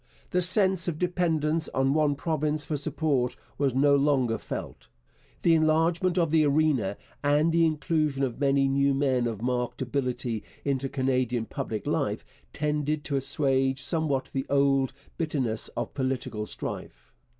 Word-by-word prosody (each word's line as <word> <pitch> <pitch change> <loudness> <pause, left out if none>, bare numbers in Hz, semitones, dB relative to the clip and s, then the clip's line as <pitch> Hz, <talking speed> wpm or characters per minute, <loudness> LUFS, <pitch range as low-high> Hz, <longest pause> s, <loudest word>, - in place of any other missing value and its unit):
The 180 - +2
sense 190 -1 +4
of 165 -3 -2
dependence 165 -3 0
on 135 +1 +2
one 150 -2 +2
province 150 0 0
for 155 - -2
support 140 -4 0 0.2
was 135 -3 +1
no 140 +1 +4
longer 135 -5 +2
felt. - - -7 0.6
The 170 - +5
enlargement 165 +3 +2
of 165 -3 +2
the 160 -1 +4
arena 145 -8 +1 0.3
and 145 +3 +3
the 165 0 +4
inclusion 150 -2 0
of 125 -2 -2
many 140 -1 +3
new 140 0 +2
men 130 -3 +1
of 110 -2 -5
marked 125 -1 -1
ability 125 -3 -2 0.2
into 135 -1 -1
Canadian 130 -3 0
public 110 -1 -5
life - - -1 0.3
tended 150 0 -1
to 145 - -2
assuage 135 -1 +1
somewhat 155 -5 -1
the 135 -1 -2
old 140 -1 +3
time 130 - -22 0.2
bitterness 130 -9 -1
of - - -3
political 130 -5 -3
strife. - - -7
140 Hz, 150 wpm, -27 LUFS, 130-155 Hz, 0.6 s, The